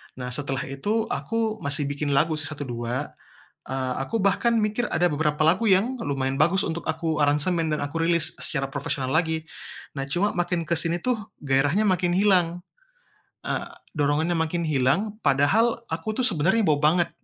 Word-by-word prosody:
Nah 125 Hz, -1 st, -6 dB
setelah 135 Hz, -1 st, -3 dB
itu, 210 Hz, +12 st, -1 dB
aku, 225 Hz, -1 st, -1 dB
masih 140 Hz, +1 st, +1 dB
bikin 145 Hz, +1 st, -2 dB
lagu 155 Hz, +2 st, +2 dB
sih -, -, -1 dB
1-2. 130 Hz, -2 st, -4 dB, 0.6 s
Eee, 130 Hz, -1 st, -2 dB
aku 225 Hz, +11 st, -2 dB
bahkan 210 Hz, +4 st, +2 dB
mikir 215 Hz, +3 st, 0 dB
ada 175 Hz, -, +2 dB
beberapa 150 Hz, -1 st, 0 dB
lagu 195 Hz, +6 st, +3 dB
yang 230 Hz, +8 st, +2 dB
lumayan 135 Hz, -4 st, -1 dB
bagus 170 Hz, +5 st, +3 dB
untuk 170 Hz, 0 st, -3 dB
aku 160 Hz, -1 st, -1 dB
aransemen 155 Hz, +3 st, +1 dB
dan 150 Hz, -, 0 dB
aku 155 Hz, +3 st, -2 dB
rilis 170 Hz, -1 st, +1 dB
secara 135 Hz, -2 st, -1 dB
profesional 135 Hz, -1 st, -3 dB
lagi, 160 Hz, -1 st, 0 dB, 0.5 s
nah 135 Hz, -, -3 dB
cuma 180 Hz, +9 st, 0 dB
makin 175 Hz, -1 st, -1 dB
ke 170 Hz, -, +1 dB
sini 170 Hz, +1 st, 0 dB
tuh, 245 Hz, +4 st, -1 dB, 0.3 s
gairahnya 145 Hz, +10 st, +2 dB
makin 180 Hz, -2 st, +2 dB
hilang. 180 Hz, -3 st, +2 dB, 0.8 s
E -, -, 0 dB, 0.5 s
dorongannya 150 Hz, +4 st, +1 dB
makin 165 Hz, +1 st, -1 dB
hilang, 155 Hz, +10 st, +1 dB
padahal, 145 Hz, -, +3 dB
aku 170 Hz, +9 st, -3 dB
tuh 250 Hz, -, +6 dB
sebenarnya 190 Hz, +4 st, +3 dB
bo 150 Hz, -2 st, +3 dB
banget, 170 Hz, +3 st, +3 dB
160 Hz, 165 wpm, -25 LUFS, 145-190 Hz, 0.8 s, tuh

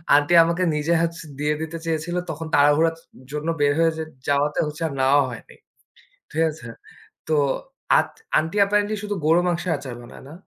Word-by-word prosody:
Aunty 145 Hz, +4 st, +3 dB
আমাকে 170 Hz, +2 st, 0 dB
নিজে 150 Hz, +3 st, 0 dB
হচ 170 Hz, 0 st, -1 dB, 0.2 s
দিয়ে 150 Hz, +1 st, +1 dB
দিতে 160 Hz, +1 st, -5 dB
চেয়েছিল। 165 Hz, +2 st, -2 dB
তখন 160 Hz, +1 st, -5 dB
তাড়াহুড়ার 150 Hz, +3 st, +4 dB, 0.4 s
জন্য 150 Hz, +2 st, -4 dB
বের 145 Hz, 0 st, +4 dB
হয়ে 165 Hz, 0 st, +4 dB
যেত 160 Hz, 0 st, -5 dB, 0.2 s
যাওয়াতে 145 Hz, +1 st, +1 dB
হচ্ছে 150 Hz, +2 st, -8 dB
আর -, -, -6 dB
নেওয়া 135 Hz, +2 st, +4 dB
হয়নি। 115 Hz, -, -10 dB, 0.8 s
ঠিক 160 Hz, +2 st, 0 dB
আছে, 150 Hz, -6 st, -11 dB, 0.6 s
তো 160 Hz, -, 0 dB, 0.6 s
আত -, -, +2 dB, 0.3 s
আন্টি 160 Hz, +5 st, -1 dB
অ্যাপারেন্টলি 205 Hz, +1 st, +2 dB
শুধু 205 Hz, 0 st, -3 dB
গরুর 165 Hz, +3 st, +4 dB
মাংসের 175 Hz, 0 st, -1 dB
আচার 130 Hz, -3 st, -8 dB
বানায় 120 Hz, -, -13 dB
না। -, -, -10 dB
160 Hz, 170 wpm, -23 LUFS, 145-170 Hz, 0.8 s, তাড়াহুড়ার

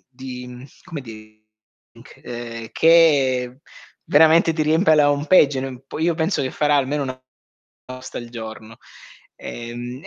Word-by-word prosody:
di, 125 Hz, -1 st, -8 dB
mhmm, 125 Hz, +1 st, -11 dB, 0.2 s
come 165 Hz, -6 st, -7 dB
dire 110 Hz, -2 st, -13 dB, 0.6 s
c 115 Hz, -2 st, -9 dB
che 135 Hz, -7 st, +3 dB, 0.5 s
veramente 160 Hz, +2 st, +4 dB
ti 155 Hz, -, 0 dB
riempie 160 Hz, +2 st, +3 dB
la 145 Hz, -1 st, +4 dB
home 145 Hz, +1 st, -2 dB
page, 135 Hz, -7 st, +2 dB
po -, -, -8 dB
io 165 Hz, +2 st, +1 dB
penso 160 Hz, +4 st, -1 dB
che 130 Hz, -, -2 dB
farà 150 Hz, +1 st, +1 dB
almeno 140 Hz, +1 st, 0 dB
una 130 Hz, -2 st, -3 dB, 0.8 s
una -, -, -10 dB
posta 130 Hz, -, -8 dB
al 120 Hz, -1 st, -8 dB
giorno. 110 Hz, -1 st, -9 dB, 0.6 s
Ehm 120 Hz, +2 st, -8 dB
130 Hz, 145 wpm, -21 LUFS, 120-155 Hz, 0.8 s, veramente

